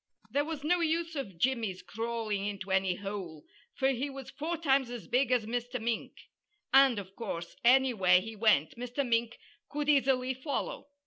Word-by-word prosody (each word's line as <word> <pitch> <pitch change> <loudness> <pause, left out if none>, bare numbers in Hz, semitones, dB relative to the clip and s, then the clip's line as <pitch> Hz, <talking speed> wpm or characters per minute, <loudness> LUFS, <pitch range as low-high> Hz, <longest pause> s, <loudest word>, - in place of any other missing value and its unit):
There 285 +1 +1
was 310 -3 -5
no 355 +4 +2
use 330 0 0
of 200 - -5
Jimmy's 225 -3 0
crawling 225 -3 -3
into 200 -2 -5
any 190 -1 +2
hole, 195 -6 -6 0.3
for 265 - +2
he 270 +2 -1
was 270 -1 -8
four 315 +5 -3
times 270 -5 +2
as 240 -2 -7
big 250 +1 +2
as 245 -4 +2
Mr. 245 +2 -3
Mink; 230 0 -2 0.6
and, 270 -3 +6
of 195 -1 -7
course, 170 -7 -5
anywhere 235 -8 +5
he 220 +4 -7
went, 205 -9 +3
Mr. 250 +3 -3
Mink 230 0 0 0.3
could 295 0 -3
easily 265 -3 +3
follow. 270 +2 -4
245 Hz, 170 wpm, -31 LUFS, 205-270 Hz, 0.6 s, and